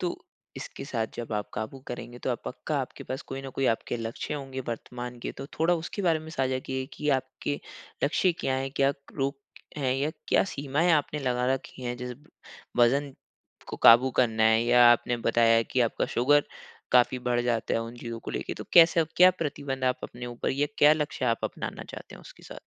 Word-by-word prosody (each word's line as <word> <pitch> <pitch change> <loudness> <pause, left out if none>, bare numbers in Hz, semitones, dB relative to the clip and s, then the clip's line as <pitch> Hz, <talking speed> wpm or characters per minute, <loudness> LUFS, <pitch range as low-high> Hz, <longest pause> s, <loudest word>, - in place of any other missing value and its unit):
तो 175 -1 -2 0.4
इसके - - -7
साथ 115 -5 -2
जब 115 -1 -6
आप 105 -1 -2
काबू 110 +5 -5
करेंगे, 120 0 -7
तो 125 - -1
पक्का 150 +4 -4
आपके 130 - -7
पास 130 - -5
कोई 135 0 -7
न 135 - -7
कोई 135 - +2
आपके 115 - -4
लक्ष्य 115 +5 -4
होंगे 135 -2 -5
वर्तमान 120 +1 -6
के, - - -5
तो 135 - -8
थोड़ा 165 +3 +3
उसके 170 +5 -4
बारे 165 -3 +3
में 160 0 -10
साझा 130 -4 0
किए, 130 0 -4
कि 150 +1 -5
आपके 130 +2 -5 0.4
लक्ष्य 175 +5 +2
क्या 130 - 0
हैं, 135 0 -2
क्या 135 0 +3
क - - -22 0.2
रोग 140 0 0 0.4
हैं 130 -3 0
या 140 +3 0 0.2
क्या - - +4
सीमाएँ 145 0 0
आपने 150 0 +1
लगा 125 -2 0
रखी 130 0 -9
हैं? 120 0 -3
जैसे 125 0 -6 0.6
वज़न 135 +4 +3 0.6
को - - -5
काबू 120 +3 +7
करना 110 -3 +3
है 110 +1 +4
या 120 0 +6
आपने 120 +1 0
बताया 115 0 +4
कि 125 - -1
आपका 115 - +1
शुगर, 145 +4 +3 0.5
काफ़ी 125 0 +4
बढ़ 120 -1 0
जाता 120 -2 0
है 115 - +1
उन 115 +1 -8
चीज़ों 115 -1 -6
को - - -7
लेके, - - -4
तो - - -8
कैसे 170 0 +7
आप 160 - 0
क्या 180 +1 +8
प्रतिबंध 140 -6 -4
आप 130 0 +1
अपने 125 0 -7
ऊपर 120 -1 -3
या 140 +2 +1
क्या 150 +1 +7
लक्ष्य 150 -4 -2
आप 115 -2 0
अपनाना - - -5
चाहते - - -10
हों - - -14
उसके - - -15
साथ? - - -10
130 Hz, 210 wpm, -27 LUFS, 120-145 Hz, 0.6 s, क्या